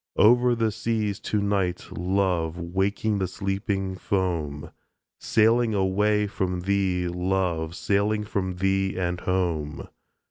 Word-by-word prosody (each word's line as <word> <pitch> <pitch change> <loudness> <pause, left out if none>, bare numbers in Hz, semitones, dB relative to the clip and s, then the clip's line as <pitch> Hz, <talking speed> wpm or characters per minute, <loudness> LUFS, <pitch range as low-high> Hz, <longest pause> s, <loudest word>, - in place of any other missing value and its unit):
Over 120 +2 +5
the 115 -1 +1
seas 110 -2 -1
to 105 - -1
night, 100 -3 -1
love, 90 -3 0
Waking 95 +4 -1
the 95 - 0
sleeping 95 0 -2
foam 85 -7 -2 0.5
Sailing 115 0 +3
away 105 +2 +2
from 95 -3 -2
thee, 95 -2 0
love, 90 -2 -1
Sailing 105 +2 +1
from 95 -3 -2
thee 95 +1 0
and 90 -1 -1
home. 85 -6 -2
95 Hz, 115 wpm, -25 LUFS, 90-105 Hz, 0.5 s, Over